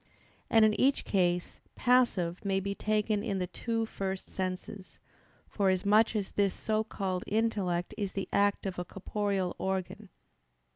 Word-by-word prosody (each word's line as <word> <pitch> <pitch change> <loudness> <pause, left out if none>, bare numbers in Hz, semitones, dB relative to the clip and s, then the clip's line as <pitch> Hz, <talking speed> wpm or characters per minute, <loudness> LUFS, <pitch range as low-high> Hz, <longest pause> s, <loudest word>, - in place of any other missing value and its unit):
And 225 -1 +6
in 215 - +4
each 275 +1 +3
case 175 -3 0 0.2
"passive" 230 -9 +2
may 195 -1 +1
be 200 +1 -2
taken 215 0 0
in 200 -3 -2
the 180 - -1
two 225 +5 -2
first 195 -3 -5
senses; 185 +1 -5 0.5
forasmuch 200 +3 +3
as 200 -3 -2
this 200 -2 +1
so 215 0 0
called 190 -4 -3
intellect 200 -5 0
is 200 -2 -2
the 195 - -3
act 200 0 +2
of 190 -2 -3
a - - -1
corporeal 195 -1 -2
organ. 190 -1 -3
200 Hz, 145 wpm, -30 LUFS, 185-215 Hz, 0.5 s, And